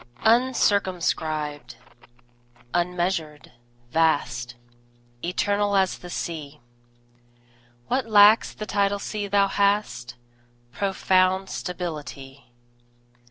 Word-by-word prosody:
UNCIRCUMSCRIBED, 175 - +1 1.0
unmeasured, 175 -4 -2 0.4
vast, 135 -6 0 0.7
Eternal 205 +3 0
as 190 -1 +1
the 180 - -10
Sea; 150 -4 -5 1.3
What 255 -2 -1
lacks 210 0 +6
the 215 - -7
tidal 200 0 +1
sea 205 0 -4
thou 200 0 +3
hast 200 - 0 0.6
Profound 190 +1 +1
stability. 145 -7 -7
185 Hz, 70 wpm, -24 LUFS, 155-200 Hz, 1.3 s, lacks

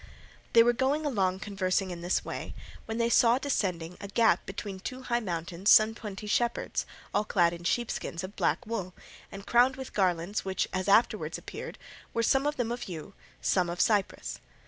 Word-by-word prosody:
They 230 - +8
were 240 +1 +4
going 270 +5 0
along 190 -8 0
conversing 190 -2 -1
in 170 -1 -6
this 175 +2 0
way, - - -6 0.3
when 225 0 -3
they 235 0 +2
saw 235 +1 +5
descending 180 - -2
a 200 - -5
gap 215 -2 +2
between 195 0 -6
two 255 +6 -6
high 240 -2 0
mountains 175 -1 -2
some 215 0 +7
twenty 210 -2 -7
shepherds, 235 +3 0 0.3
all - - +2
clad 175 -5 +2
in 170 0 -8
sheepskins 175 -3 -2
of 185 +2 -7
black 250 - 0
wool, 205 -5 -4 0.4
and 195 0 -9
crowned 245 +2 +4
with 265 -1 -8
garlands 185 0 0
which, 190 -1 -1
as 185 +1 -2
afterwards 220 +4 +3
appeared, - - -8 0.4
were, 230 - +2
some 270 +5 +3
of 295 - 0
them 240 -2 -1
of 240 -4 -5
yew, 160 -4 -7 0.3
some 180 -2 +2
of 175 +1 -5
cypress. 205 -3 +1
205 Hz, 185 wpm, -29 LUFS, 185-235 Hz, 0.4 s, They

